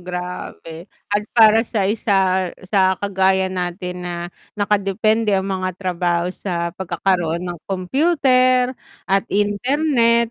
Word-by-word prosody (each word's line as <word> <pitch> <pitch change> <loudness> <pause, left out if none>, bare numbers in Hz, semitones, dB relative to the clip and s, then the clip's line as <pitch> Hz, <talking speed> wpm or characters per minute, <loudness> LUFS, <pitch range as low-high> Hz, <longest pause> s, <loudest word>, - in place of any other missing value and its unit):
grabe, 180 -2 -7 0.2
at 205 0 +1
para 220 -1 +7
sa 210 -4 -1
isa, 190 -4 +1 0.2
sa 190 -2 +3
kagaya 190 -1 +1
natin 180 0 -4
na 175 - -4 0.4
nakadepende 210 +1 +1
ang 190 0 0
mga 185 -2 -3
trabaho 175 -1 -1
sa 170 -2 -3
pagkakaroon 175 -2 -1
ng 175 -1 -5
kompyuter 255 - +2 0.4
at 195 0 +3
internet, 235 +3 +1
190 Hz, 110 wpm, -20 LUFS, 180-220 Hz, 0.4 s, para